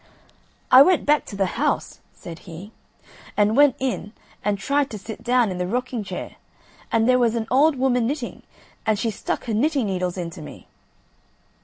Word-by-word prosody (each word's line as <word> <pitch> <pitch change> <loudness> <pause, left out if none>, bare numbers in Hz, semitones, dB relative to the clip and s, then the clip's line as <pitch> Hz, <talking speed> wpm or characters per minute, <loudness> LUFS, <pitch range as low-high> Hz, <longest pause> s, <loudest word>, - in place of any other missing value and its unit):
"I 255 +1 +10
went 350 +3 +4
back 295 0 +3
to 200 - -8
the 195 -1 +1 0.2
house," 300 - -1
said 165 -1 -10
he, 175 +6 -9 0.7
"and 210 +1 +3
went 285 -2 +5
in 215 -5 -3 0.3
and 205 -1 0
tried 280 +4 0
to 215 - -6
sit 215 +2 -9
down 240 -3 +2
in 180 - -5
the 180 - -1
rocking 245 +1 -2
chair, - - -7 0.5
and 225 0 +2
there 255 0 +4
was 235 -2 +2
an 225 -1 -1
old 285 +4 +4
woman 250 -3 +1
knitting, 275 -2 -4 0.4
and 215 -1 +1
she 225 +2 -1
stuck - - -4
her 230 - -2
knitting 275 +3 +1
needles 185 -2 -2
into 170 -1 -6
me." - - -11
230 Hz, 180 wpm, -23 LUFS, 200-265 Hz, 0.7 s, I